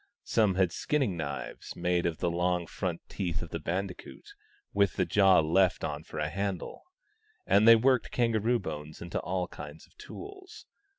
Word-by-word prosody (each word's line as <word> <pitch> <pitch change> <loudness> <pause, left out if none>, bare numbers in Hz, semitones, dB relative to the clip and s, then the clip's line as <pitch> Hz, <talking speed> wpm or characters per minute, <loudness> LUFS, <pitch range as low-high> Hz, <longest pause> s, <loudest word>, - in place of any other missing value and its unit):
Some 105 -5 +2
had 95 -2 +2
skinning 135 - 0
knives 70 -4 -5
made 90 0 +1
of 80 -2 -2
the 85 - 0
long 90 0 0
front 85 0 -4
teeth 90 -5 -3
of 85 - -10
the 85 - -3
bandicoot, 95 - -5 0.4
with 100 -2 +2
the - - +1
jaw 95 -4 +5
left 90 +4 +2
on 75 0 -3
for 80 - -10
a 75 0 0
handle; 95 +2 -4 0.6
and 105 +3 +4
they 115 - +11
worked 125 +2 +2
kangaroo 115 0 +1
bones 75 -6 -7
into 85 - -4
all 90 -1 -2
kinds 75 0 -10
of - - -29
tools. 385 0 -10
90 Hz, 170 wpm, -29 LUFS, 85-105 Hz, 0.6 s, they